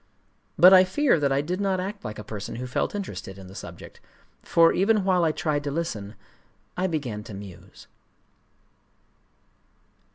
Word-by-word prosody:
But 180 +4 +8
I 185 0 +9
fear 190 - +2
that 140 -2 +1
I 135 +1 +2
did 180 +6 -3
not 195 -2 0
act 195 +2 -5
like 105 0 -6
a 105 - -7
person 105 0 -7
who 125 +2 -5
felt 130 +10 -2
interested 185 - -6
in 95 - -11
the 95 - -12
subject; - - -10 0.4
for, 165 0 +4
even 205 +2 +2
while 185 -2 +2
I 160 - +3
tried 155 -2 -1
to - - -1
listen, 115 -10 -4 0.6
I 185 +1 0
began 130 - -3
to 110 - -8
muse. 95 -2 -12
155 Hz, 165 wpm, -25 LUFS, -, 0.6 s, I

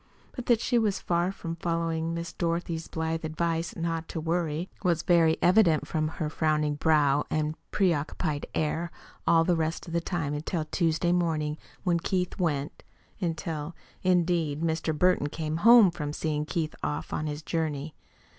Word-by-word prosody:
But 250 - -7
that 235 -2 +4
she 240 - +2
was 210 -4 +1
far 175 +1 0
from 165 -4 -6
following 165 -1 -1
Miss 170 0 -5
Dorothy's 170 -1 -2
blithe 160 0 -2
advice 165 +1 -1
"not 165 -1 -2
to - - -4
worry" 165 0 -1 0.2
was 170 -3 +1
very 165 -2 +4
evident 175 -4 +4
from 155 -1 0
her 155 0 -3
frowning 150 -1 +1
brow 145 -2 +3
and 155 0 0 0.2
preoccupied 155 -4 0
air 160 +2 0 0.4
all 165 -1 +5
the 175 +1 +2
rest 160 0 -2
of 170 - -8
the 170 - +1
time 165 -5 -2
until 155 +2 -2
Tuesday 165 +1 +1
morning 160 -4 0 0.3
when 175 -3 +2
Keith 180 +2 -1
went 150 -5 -1 0.4
until, 165 -3 -3 0.3
indeed, 170 -4 +1
Mr. 160 -1 -1
Burton 180 -3 +3
came 155 +1 -3
home 225 0 +7
from 150 -4 -4
seeing 150 -1 -2
Keith 160 -2 -2
off 75 +1 -3
on 155 - -1
his 150 +1 -4
journey. 155 -2 -2
165 Hz, 160 wpm, -28 LUFS, 155-175 Hz, 0.4 s, home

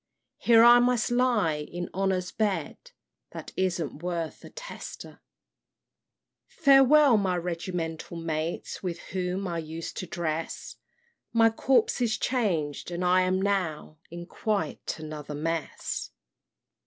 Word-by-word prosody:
Here 230 -1 +6
I 240 +1 +9
must 245 -1 +2
lie 240 -11 +2
in 175 +4 -5
Honor's 185 -2 0
bed, 205 - -2 0.4
That - - -8
isn't 175 -5 -2
worth 170 -2 -4
a - - -10
tester! - - -9 1.3
"Farewell, 280 - +6
my 190 -3 0
regimental 170 -1 -4
mates, 165 0 -3
With 175 -3 -3 0.2
whom 185 +1 -2
I 170 -1 -2
used 160 +1 -6
to 185 - -4
dress! 165 -1 -4 0.6
My 225 -1 +5
corps 245 +1 +2
is 220 -3 +1
changed, 175 - -1
and 175 +1 -3
I 180 +1 +4
am 185 +1 +1
now 180 -6 -2
In 175 +1 -8
quite 200 -4 -3
another 155 -2 -7
mess. 165 +1 -3
180 Hz, 120 wpm, -27 LUFS, 165-225 Hz, 1.3 s, I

